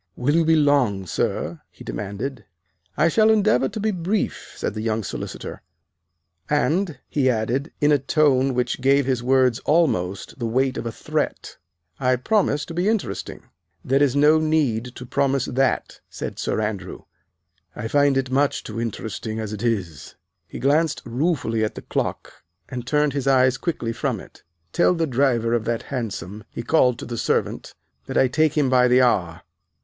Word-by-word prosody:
"Will 135 +4 0
you 165 - +4
be 160 0 +4
long, 140 -10 +2
sir!" 85 -1 -2
he - - -14
demanded. 105 - -5 0.5
"I 155 - +4
shall 215 +6 +4
endeavor 200 - +3
to - - -6
be 215 +1 0
brief," 190 +3 -2
said - - -3
the 110 - -4
young 110 0 -1
solicitor; - - -6 0.9
"and," 155 +2 +1
he 135 -3 +1
added, 125 +5 -1
in 150 0 +3
a 145 - +4
tone 135 -2 +2
which 125 +1 -1
gave 140 +1 +3
his 130 -2 0
words 130 -1 +3
almost 115 - 0
the 120 - -1
weight 130 +3 +1
of - - -4
a - - -3
threat, - - -3 0.4
"I 130 -1 +2
promise 150 - +1
to 165 - -8
be 175 +5 +1
interesting." 220 -2 -3 0.4
"There 135 +2 +2
is 140 -2 +3
no 150 +2 +5
need 150 -8 +1
to 125 - -8
promise 135 +1 +1
that," 130 -1 0
said - - -6
Sir - - -1
Andrew, 105 -4 -4 0.7
"I 110 - -4
find 145 +2 +3
it 130 -1 -1
much 140 +2 +1
too 115 +1 -5
interesting 110 -1 -4
as 110 -1 -4
it 105 - -6
is." 95 - -3 0.3
He - - -8
glanced 150 +4 +1
ruefully 120 -3 0
at 110 - -2
the - - -8
clock - - -4 0.3
and 125 -1 -6
turned 150 -1 +2
his 140 -2 -2
eyes 130 -1 +4
quickly 120 -9 -2
from 115 - -2
it. - - -15 0.3
"Tell 180 - +3
the 165 -1 +1
driver 125 -4 +1
of 115 -2 0
that 115 0 -1
hansom," 105 -4 -4
he 115 - -6
called 125 -3 +3
to - - -7
the 120 -1 -5
servant, - - -1 0.3
"that - - -2
I 130 - +5
take 155 +3 +1
him 145 -3 +3
by 125 -1 +4
the 125 +1 +5
hour." 85 -9 +1
130 Hz, 175 wpm, -23 LUFS, 115-145 Hz, 0.9 s, no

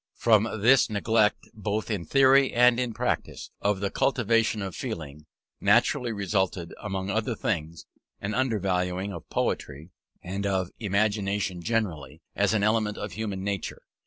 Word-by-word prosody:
From 110 -1 +3
this 125 +4 +5
neglect 105 0 +1
both 105 +1 -3
in 95 -6 -2
theory 135 0 +5
and 125 0 +5
in 125 -2 -1
practice - - -3
of 100 -1 0
the 100 - -1
cultivation 115 -4 +1
of 95 -3 -5
feeling, 75 -1 -6 0.3
naturally 120 -2 +3
resulted, 95 -4 -1
among 95 -2 -3
other 110 +3 -1
things, 80 -7 -3 0.3
an 100 +2 -3
undervaluing 95 -6 -1
of 85 - -9
poetry, 75 +6 -3 0.3
and 100 +2 -3
of 95 -2 -1
Imagination 100 -3 0
generally, 100 -8 -2
as - - +2
an 105 - +1
element 110 -1 +1
of 105 - -5
human 100 -1 -4
nature. 100 -2 -4
105 Hz, 140 wpm, -27 LUFS, 95-110 Hz, 0.3 s, this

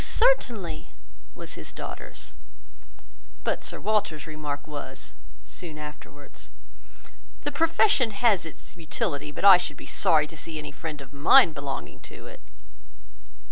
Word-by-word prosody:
certainly," 225 - +2 0.5
was - - -7
his - - -6
daughter's; 60 +1 -8 1.1
but - - 0
Sir - - -2
Walter's 195 -7 0
remark 150 -3 -5
was, 140 - -7 0.3
soon 165 -4 -6
afterwards— 150 -1 -11 0.9
"The 290 - -1
profession 325 - +3
has 210 -3 +3
its 160 - -8
utility, 150 -3 -3
but 170 - -3
I 195 -2 +11
should 180 - -4
be - - -10
sorry 155 -2 +3
to 160 - -11
see 160 +1 -5
any 150 -1 -6
friend 150 0 -6
of 135 0 -12
mine 165 - +6
belonging 140 - -6
to - - -12
it." - - -11
155 Hz, 135 wpm, -26 LUFS, 145-200 Hz, 1.1 s, I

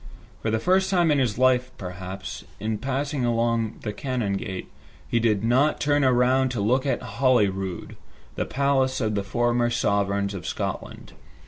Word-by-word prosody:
For 115 - -1
the 110 - +1
first 190 +9 +2
time 175 -4 +3
in 145 - +3
his 120 -5 0
life, 125 0 +3
perhaps, 90 0 -7 0.2
in 110 0 -2
passing 135 +2 -2
along 115 -2 0
the 105 - -3
Canongate, 100 -7 -3 0.4
he 120 - +1
did 110 -3 +1
not 130 +6 +3
turn 145 0 +2
to 130 -1 +3
look 130 +7 +1
at 135 - -1
Holyrood, 100 -6 0 0.4
the - - -2
palace 135 -1 +1
of 110 -4 0
the 100 -1 -1
former 120 +4 +1
sovereigns 100 -3 0
of 95 -4 -6
Scotland. - - -5
120 Hz, 150 wpm, -25 LUFS, 100-130 Hz, 0.4 s, time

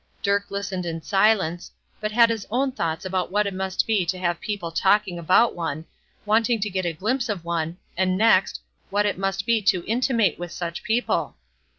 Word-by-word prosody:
Dirk 200 0 +1
listened 195 -2 -3
in 165 -1 -4
silence, 195 -4 +2 0.3
but 215 0 -2
had 230 +1 +5
his 220 -3 -4
own 265 +5 0
thoughts 165 -9 -3
about 185 -1 -2
what 210 +1 +2
it 200 - -2
must 190 0 -1
be 215 -4 +2
to 185 +2 -1
have 175 -2 -1
people 200 -6 -4
talking 190 +1 +2
about 185 +8 +4
one, 160 -2 -4 0.4
wanting 225 +2 +2
to 210 0 -2
get 185 -1 -1
a 170 - -1
glimpse 230 - -1
of 190 -5 -3
one, 170 0 -2 0.2
and 185 +1 +1
next, 205 -3 +3 0.3
what 205 +1 +1
it 200 -3 -1
must 195 0 -1
be 230 -1 +2
to 190 -3 +2
be - - -17
intimate 230 -3 +1
with 175 -1 -6
such 170 -1 -5
people. 235 +3 -1
195 Hz, 200 wpm, -24 LUFS, 175-215 Hz, 0.4 s, had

